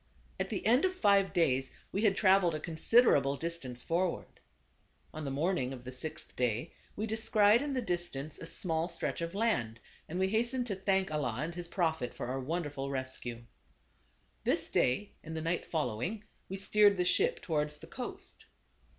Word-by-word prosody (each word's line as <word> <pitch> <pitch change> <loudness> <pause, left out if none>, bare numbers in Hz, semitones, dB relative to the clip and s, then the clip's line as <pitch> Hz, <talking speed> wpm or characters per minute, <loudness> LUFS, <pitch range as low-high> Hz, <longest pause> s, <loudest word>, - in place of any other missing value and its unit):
At - - -1
the - - -3
end 245 +6 +5
of 370 0 +1
five 200 - +4
days 135 -6 +2 0.2
we 200 - -1
had 205 -3 +3
traveled 185 -4 +4
a - - -3
considerable 160 - +4
distance 140 -6 -5
forward. 175 +1 -1 0.7
On 155 -1 -5
the - - -2
morning 140 -2 0
of 125 -2 -9
the 130 - -7
sixth 155 +5 -5
day 125 +4 -1 0.2
we 215 - -2
descried 220 0 +4
in 290 -1 -2
the 255 -2 -1
distance 175 -7 -3
a 165 - -7
small 165 -3 0
stretch 175 - -3
of 170 +2 -4
land, 120 - 0 0.3
and 170 - -4
we 190 0 +2
hastened 240 +4 +1
to 210 -5 -2
thank 190 -1 +1
Allah 125 -6 -1
and 165 +3 -3
his 175 0 -6
Prophet 160 -8 -1
for - - -4
our 130 +2 -2
wonderful 145 -1 -3
rescue. 130 -3 -4 1.0
This - - +1
day 195 +12 +1
and 160 0 -6
the - - -2
night 165 +2 -1
fol 160 -2 0
lowing, 145 - -3 0.3
we 195 - -4
steered 205 +1 +4
the 180 - +1
ship 450 - +2
towards 150 -2 -1
the - - -11
coast. - - -8
170 Hz, 180 wpm, -32 LUFS, 140-200 Hz, 1.0 s, end